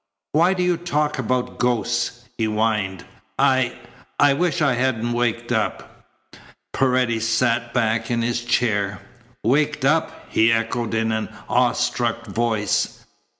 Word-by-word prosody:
"Why 170 Hz, +5 st, +3 dB
do 180 Hz, -, 0 dB
you 180 Hz, -1 st, +2 dB
talk 150 Hz, -4 st, -1 dB
about 125 Hz, 0 st, -2 dB
ghosts?" 120 Hz, 0 st, -1 dB
he 115 Hz, -, -1 dB
whined. 105 Hz, -3 st, -1 dB, 0.3 s
"I 130 Hz, -3 st, +2 dB, 0.4 s
I 145 Hz, -1 st, +6 dB
wish 175 Hz, +3 st, 0 dB
I 145 Hz, -4 st, +3 dB
hadn't 120 Hz, -2 st, 0 dB
waked 120 Hz, 0 st, -1 dB
up." 110 Hz, -3 st, -3 dB, 0.7 s
Paredes 125 Hz, -4 st, +1 dB
sank 115 Hz, 0 st, +1 dB
back 115 Hz, -2 st, 0 dB
in 120 Hz, -1 st, 0 dB
his 120 Hz, 0 st, -1 dB
chair. 105 Hz, -5 st, 0 dB, 0.4 s
"Waked 145 Hz, +3 st, +1 dB
up!" 155 Hz, +4 st, 0 dB
he 110 Hz, +1 st, +3 dB
echoed 115 Hz, 0 st, -1 dB
in 110 Hz, 0 st, +1 dB
an 110 Hz, 0 st, -2 dB, 0.2 s
awe 125 Hz, -1 st, +3 dB
struck 120 Hz, -1 st, -1 dB
voice. 105 Hz, -, -1 dB
120 Hz, 135 wpm, -22 LUFS, 115-130 Hz, 0.7 s, I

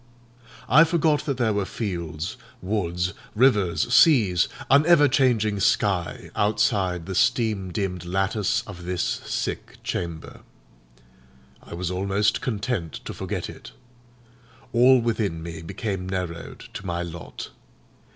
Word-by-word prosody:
I 150 Hz, +7 st, +7 dB
forgot 160 Hz, -3 st, +1 dB
that 140 Hz, -, -1 dB
there 115 Hz, -4 st, +1 dB
were 100 Hz, -1 st, 0 dB
fields, 85 Hz, -6 st, -4 dB, 0.2 s
woods, 90 Hz, -3 st, -1 dB, 0.2 s
rivers, 105 Hz, -, +3 dB
seas, 110 Hz, -, +5 dB, 0.2 s
an 140 Hz, +3 st, +6 dB
ever 165 Hz, -4 st, +6 dB
changing 120 Hz, -7 st, +2 dB
sky 90 Hz, -5 st, 0 dB
outside 95 Hz, -4 st, +1 dB
the 95 Hz, -, -5 dB
steam 110 Hz, -4 st, +1 dB
dimmed 90 Hz, -2 st, -3 dB
lattice 95 Hz, +5 st, 0 dB
of 90 Hz, -4 st, -10 dB
this 90 Hz, -1 st, -1 dB
sick -, -, -3 dB
chamber; 85 Hz, -3 st, -5 dB, 1.2 s
I -, -, -9 dB
was 90 Hz, +1 st, -3 dB
almost 100 Hz, +3 st, +1 dB
content 105 Hz, -, -2 dB
to -, -, -5 dB
forget 95 Hz, -1 st, -4 dB
it. -, -, -11 dB, 1.0 s
All 125 Hz, +2 st, +6 dB
within 110 Hz, -8 st, -1 dB
me 80 Hz, -1 st, -7 dB
became 95 Hz, +2 st, -4 dB
narrowed 90 Hz, -3 st, -5 dB
to -, -, -7 dB
my 85 Hz, -2 st, -2 dB
lot. 85 Hz, 0 st, -8 dB
95 Hz, 120 wpm, -24 LUFS, 90-115 Hz, 1.2 s, I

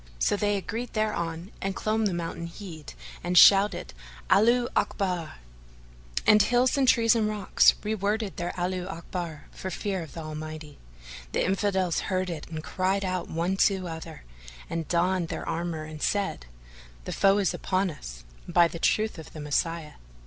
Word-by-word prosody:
So 135 Hz, -, +2 dB
they 205 Hz, 0 st, +1 dB
agreed 225 Hz, +6 st, -5 dB
thereon 175 Hz, -5 st, -2 dB
and 195 Hz, 0 st, -2 dB
clomb 215 Hz, 0 st, +1 dB
the -, -, -1 dB
mountain 170 Hz, 0 st, -4 dB
head 170 Hz, -4 st, -9 dB, 0.3 s
and 180 Hz, +1 st, 0 dB
shouted, 195 Hz, -, +6 dB, 0.4 s
"Allaho 240 Hz, +4 st, +5 dB
Akbar!"; 180 Hz, -5 st, -1 dB, 0.9 s
and 210 Hz, 0 st, +7 dB
hills 245 Hz, +4 st, +3 dB
and 275 Hz, -2 st, +2 dB
trees 230 Hz, -2 st, +5 dB
and 225 Hz, -2 st, +1 dB
rocks 210 Hz, -2 st, +4 dB
re 215 Hz, +1 st, -1 dB
worded 210 Hz, 0 st, -1 dB
their 175 Hz, 0 st, -2 dB
Allaho 180 Hz, +1 st, -2 dB
Akbar 170 Hz, -3 st, -6 dB
for 190 Hz, -, -6 dB
fear 190 Hz, 0 st, -3 dB
of 160 Hz, -, -9 dB
the 165 Hz, -, -6 dB
Almighty. 155 Hz, -1 st, -7 dB, 0.5 s
The -, -, +1 dB
Infidels 190 Hz, -2 st, +1 dB
heard 185 Hz, -1 st, 0 dB
it 155 Hz, -3 st, -7 dB
and 160 Hz, -1 st, -6 dB
cried 190 Hz, +3 st, 0 dB
out 185 Hz, -1 st, -2 dB
one 170 Hz, +4 st, -1 dB
to 190 Hz, -2 st, +2 dB
other 160 Hz, -1 st, -8 dB, 0.5 s
and 165 Hz, -1 st, -3 dB
donned 175 Hz, 0 st, +1 dB
their -, -, -5 dB
armour 165 Hz, -1 st, -2 dB
and 155 Hz, -1 st, -9 dB
said, 195 Hz, -, -1 dB, 0.6 s
"The -, -, -4 dB
foe 195 Hz, 0 st, +4 dB
is 200 Hz, -3 st, +1 dB
upon 185 Hz, -1 st, 0 dB
us, -, -, -10 dB, 0.2 s
by 175 Hz, 0 st, +5 dB
the 170 Hz, -, -8 dB
truth 215 Hz, +1 st, +1 dB
of 160 Hz, -, -11 dB
the 155 Hz, -, -8 dB
Messiah!" 150 Hz, +2 st, -2 dB
185 Hz, 165 wpm, -27 LUFS, 165-205 Hz, 0.9 s, and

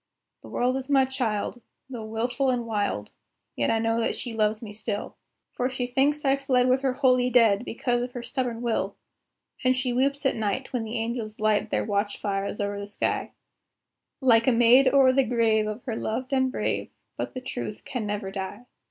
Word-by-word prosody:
The -, -, -12 dB
world 250 Hz, +2 st, +1 dB
is 265 Hz, +1 st, -6 dB
my 270 Hz, -2 st, +5 dB
child. 245 Hz, -3 st, -2 dB, 0.3 s
Though 240 Hz, -4 st, -6 dB
wilful 245 Hz, +4 st, -1 dB
and 245 Hz, -2 st, 0 dB
wild, 205 Hz, -, -2 dB, 0.4 s
Yet 115 Hz, -, 0 dB
I 225 Hz, -, +3 dB
know 225 Hz, +1 st, +1 dB
that 230 Hz, -, 0 dB
she 240 Hz, -, -5 dB
loves 215 Hz, -1 st, +1 dB
me 215 Hz, -3 st, -8 dB
still, 210 Hz, -1 st, -4 dB, 0.4 s
For 250 Hz, +1 st, -1 dB
she 255 Hz, -1 st, -2 dB
thinks 280 Hz, +4 st, +1 dB
I 270 Hz, 0 st, +4 dB
fled 255 Hz, -2 st, +2 dB
with 255 Hz, +1 st, +3 dB
her 265 Hz, -2 st, +1 dB
holy 255 Hz, -2 st, +3 dB
dead, 230 Hz, -4 st, +4 dB
Because 240 Hz, 0 st, -1 dB
of 245 Hz, 0 st, -4 dB
her 245 Hz, -, -5 dB
stubborn 240 Hz, -1 st, -3 dB
will; 235 Hz, -2 st, -1 dB, 0.7 s
And 255 Hz, 0 st, +4 dB
she 255 Hz, -1 st, 0 dB
weeps 275 Hz, +3 st, 0 dB
at 270 Hz, -, +2 dB
night, 220 Hz, +5 st, -2 dB
when 240 Hz, -3 st, -1 dB
the 225 Hz, +2 st, -4 dB
angels 225 Hz, -1 st, -3 dB
light 215 Hz, 0 st, +2 dB
Their -, -, 0 dB
watch 205 Hz, -1 st, -1 dB
fires 200 Hz, 0 st, -2 dB
over 205 Hz, 0 st, -2 dB
the 200 Hz, -, -6 dB
sky, 205 Hz, -, -2 dB, 0.9 s
Like 230 Hz, -3 st, +5 dB
a -, -, +6 dB
maid 240 Hz, +3 st, +6 dB
o'er 270 Hz, -2 st, +6 dB
the 270 Hz, +1 st, +4 dB
grave 225 Hz, -3 st, +2 dB
of 215 Hz, +3 st, -5 dB
her 235 Hz, -4 st, -3 dB
loved 255 Hz, +5 st, -3 dB
and 260 Hz, -1 st, +2 dB
brave; -, -, -2 dB, 0.3 s
But -, -, -5 dB
the 255 Hz, -, -4 dB
Truth 115 Hz, -, -6 dB
can 240 Hz, -5 st, -3 dB
never 205 Hz, -1 st, -3 dB
die. 195 Hz, +4 st, -6 dB
240 Hz, 200 wpm, -26 LUFS, 215-255 Hz, 0.9 s, a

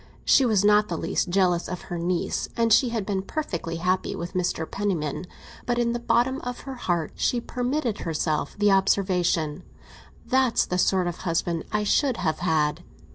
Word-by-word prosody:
She 265 Hz, -, +5 dB
was 205 Hz, -3 st, +2 dB
not 210 Hz, 0 st, +5 dB
the -, -, -3 dB
least -, -, -1 dB
jealous 180 Hz, -2 st, +2 dB
of 180 Hz, -, -5 dB
her 175 Hz, -2 st, -5 dB
niece, 175 Hz, +1 st, -1 dB
and 230 Hz, -1 st, +3 dB
she 250 Hz, +2 st, +5 dB
had 225 Hz, -4 st, -2 dB
been 195 Hz, -2 st, -1 dB
perfectly 185 Hz, -, -4 dB
happy 180 Hz, +2 st, -1 dB
with 175 Hz, +1 st, -6 dB
Mr. 180 Hz, -3 st, -1 dB
Penniman, 165 Hz, -5 st, -2 dB, 0.4 s
but 240 Hz, 0 st, +1 dB
in 235 Hz, -1 st, +1 dB
the 240 Hz, -, -2 dB
bottom 240 Hz, +3 st, +1 dB
of 245 Hz, 0 st, -5 dB
her 270 Hz, -, -7 dB
heart 175 Hz, -, -2 dB
she 245 Hz, -, 0 dB
permitted 245 Hz, 0 st, -2 dB
herself 155 Hz, -2 st, -2 dB
the 205 Hz, 0 st, +3 dB
observation: 180 Hz, -4 st, +1 dB, 0.6 s
"That's 260 Hz, -2 st, +2 dB
the 180 Hz, -, -2 dB
sort 185 Hz, 0 st, +2 dB
of 175 Hz, -1 st, -3 dB
husband 170 Hz, -1 st, -1 dB
I 210 Hz, -1 st, 0 dB
should 255 Hz, +4 st, +2 dB
have 160 Hz, -4 st, -1 dB
had!" 150 Hz, -2 st, +1 dB
190 Hz, 180 wpm, -25 LUFS, 170-235 Hz, 0.6 s, She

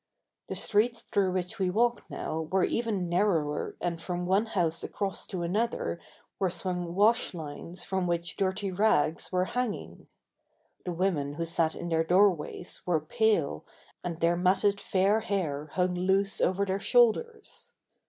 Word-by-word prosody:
The -, -, -4 dB
streets 230 Hz, +3 st, +1 dB
through 190 Hz, -2 st, 0 dB
which 185 Hz, +4 st, -3 dB
we 190 Hz, -1 st, +1 dB
walked 235 Hz, +5 st, +1 dB
now 160 Hz, 0 st, -4 dB
were 190 Hz, -1 st, +3 dB
even 215 Hz, -6 st, 0 dB
narrower 170 Hz, -5 st, 0 dB
and 170 Hz, -1 st, -3 dB
from 180 Hz, +1 st, -3 dB
one 195 Hz, +5 st, +2 dB
house 170 Hz, -6 st, 0 dB
across 195 Hz, -2 st, -3 dB
to 180 Hz, -2 st, -4 dB
another 205 Hz, 0 st, -1 dB, 0.4 s
were 190 Hz, -, +2 dB
swung 180 Hz, 0 st, -3 dB
wash 210 Hz, -1 st, +3 dB
lines 165 Hz, +3 st, -6 dB
from 190 Hz, -2 st, -1 dB
which 170 Hz, 0 st, -2 dB
dirty 195 Hz, 0 st, -1 dB
rags 180 Hz, -5 st, +1 dB
were 185 Hz, 0 st, +1 dB
hanging. 245 Hz, 0 st, -4 dB, 0.8 s
The 180 Hz, -, -2 dB
women 165 Hz, -6 st, 0 dB
who 165 Hz, +1 st, -2 dB
sat 165 Hz, -1 st, +1 dB
in 175 Hz, -, -5 dB
their 165 Hz, -1 st, +2 dB
doorways 180 Hz, -1 st, +1 dB
were 175 Hz, -3 st, +1 dB
pale 160 Hz, -, +1 dB, 0.4 s
and 170 Hz, -2 st, -4 dB
their 170 Hz, +1 st, +3 dB
matted 195 Hz, +3 st, +2 dB
fair 195 Hz, +3 st, +2 dB
hair 155 Hz, -9 st, -2 dB
hung 180 Hz, 0 st, +1 dB
loose 190 Hz, +2 st, +1 dB
over 190 Hz, +2 st, +2 dB
their 190 Hz, 0 st, -1 dB
shoulders. 245 Hz, -, +1 dB
185 Hz, 155 wpm, -29 LUFS, 170-200 Hz, 0.8 s, were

